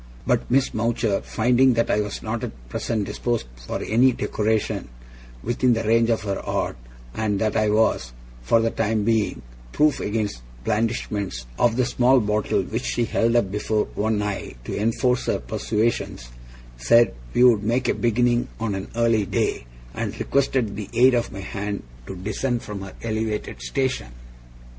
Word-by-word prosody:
But - - +1
Miss 135 +2 +2
Mowcher, 115 -2 0
finding 125 +3 +3
that 115 - +1
I 105 - +2
was 105 -1 -5
not 110 +1 -3
at - - -8
present 105 - -2
disposed 120 +3 -2 0.2
for - - -3
any 125 +4 +4
decoration 110 -1 -1 0.6
within 120 +2 +2
the 115 0 -1
range 115 +1 +3
of 115 -2 +1
her 100 -2 -2
art, - - -2 0.4
and 105 -2 0
that 110 0 0
I 110 -1 +2
was, 105 - +2 0.3
for 65 - +3
the 115 0 +1
time 110 -1 0
being, 110 - 0 0.3
proof 150 -1 +3
against 105 - -2
the - - -17 0.2
blandishments 105 - -1
of 120 -2 +3
the 125 0 +2
small 125 +1 +4
bottle 105 -1 0
which - - -3
she 120 - 0
held 115 +1 +1
up 100 -6 +2
before 105 +1 0
one 105 0 0
eye 100 -9 -4
to - - -4
enforce 125 +4 +1
her - - +2
persuasions, 105 - -2 0.5
said 115 - +4 0.2
we 125 - +5
would 120 -5 +6
make 120 +4 0
a - - +3
beginning 120 +1 +1
on 110 -2 -1
an 95 0 -4
early 115 -3 +2
day, - - -1 0.3
and - - -4
requested 130 -6 +1
the 105 -1 -6
aid 130 +2 +5
of 120 -1 0
my 100 - -7
hand 100 0 -4 0.2
to 95 - -6
descend 110 +6 -2
from 105 -2 -6
her 95 -1 -8
elevated 110 - -3
station. 130 - -1
110 Hz, 170 wpm, -23 LUFS, 105-120 Hz, 0.6 s, would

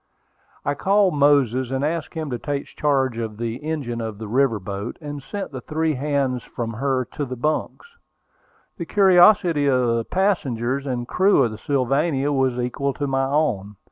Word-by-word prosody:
I 145 - +1
called 195 +4 +2
Moses, 140 -4 +3
and 135 +2 -1
asked 160 +1 -3
him 155 -3 -4
to 120 - -3
take 140 +1 -3
charge 135 -5 0
of 110 -2 -4
the 115 0 -3
engine 140 -6 -4
of 110 -2 -5
the 110 0 -7
river 120 -1 +2
boat, 100 +3 -6
and 145 -2 -7
sent 200 +6 -6
the 130 -2 -6
three 155 +4 -1
hands 135 -2 -1
from 115 -1 -5
her 130 +2 0
to 150 - -3
their 130 -2 -4
bunks. 155 - -2 0.9
The 170 - -4
curiosity 180 -5 +5
of 125 -3 +2
the 115 - -1
passengers 140 - 0
and 120 -2 -3
crew 190 -4 +3
of 115 - 0
the 110 - -8
Sylvania 140 +2 0
was 130 -3 +1
equal 130 +2 -2
to 145 - -2
my 135 -1 0
own. 125 -9 0
135 Hz, 175 wpm, -22 LUFS, 120-150 Hz, 0.9 s, curiosity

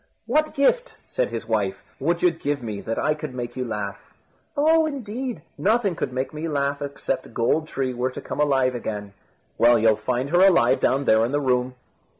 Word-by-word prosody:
"What 305 +7 +1
gift," 480 - +1
said - - -1
his - - -5
wife, - - 0 0.2
"would - - 0
you 360 - +6
give 145 - -3
me 105 -3 -4
that 115 - -3
I 155 - +2
could 150 -3 -7
make 120 -1 -5
you 130 - -2
laugh?" 105 -4 -5 0.5
"Oh! 320 +2 +4
indeed, 255 -3 -5 0.2
nothing 210 -2 +2
could 160 - -3
make 130 +3 -3
me 155 +2 -4
laugh, 140 -1 -1
except 140 -1 -4
Gold 155 +7 +1
tree 130 -4 -2
were 125 +1 -1
to 130 - -7
come - - -6
alive 135 -3 +3
again." 105 -4 -5 0.5
"Well, 120 0 +6
you'll 110 -1 +4
find 125 +6 -2
her 175 - +4
alive 135 -10 +5
down 135 +2 +1
there 110 -2 +4
in 120 - 0
the 145 - +1
room." 125 -2 0
140 Hz, 195 wpm, -24 LUFS, 120-190 Hz, 0.5 s, you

